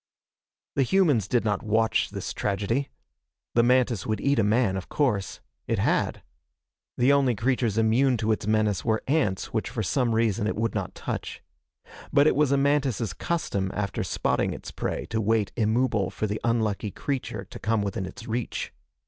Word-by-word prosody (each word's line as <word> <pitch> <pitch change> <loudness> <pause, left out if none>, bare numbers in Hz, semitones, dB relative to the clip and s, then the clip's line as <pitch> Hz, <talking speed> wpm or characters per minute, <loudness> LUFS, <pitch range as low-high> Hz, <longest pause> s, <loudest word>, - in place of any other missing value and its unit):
The 140 - +2
humans 140 - +3
did 120 -1 +1
not 105 -2 0
watch 110 0 +1
this 100 -2 -5
tragedy. 105 +7 -1 0.6
The 120 - +5
mantis 120 -3 +2
would 110 -1 -1
eat 140 -3 +2
a - - +4
man, 105 -1 +2
of 95 - -5
course. 110 -10 0 0.3
It - - 0
had. - - 0 0.7
The 125 +3 +4
only 135 -4 +3
creatures 115 -1 0
immune 120 +4 +3
to 110 0 0
its 105 -1 -1
menace 105 -4 +1
were 110 -1 0
ants, 130 -10 0
which 110 - -1
for 110 - -3
some 120 +2 +1
reason 110 -2 +1
it - - -1
would 115 +1 -1
not - - -3
touch. - - -5 0.7
But 140 - +5
it 155 - +4
was 145 -1 +3
a 140 - +4
mantis' 135 - +1
custom 100 - -2
after 100 -1 -2
spotting - - 0
its - - -8
prey - - -3
to 110 0 0
wait 110 -2 +1
immobile 110 -3 +1
for - - -3
the 105 +1 -3
unlucky 110 -3 0
creature 120 -3 -4
to - - -10
come 110 -1 0
within 95 -2 -3
its 110 +5 -10
reach. 120 +1 -3
115 Hz, 175 wpm, -26 LUFS, 105-125 Hz, 0.7 s, The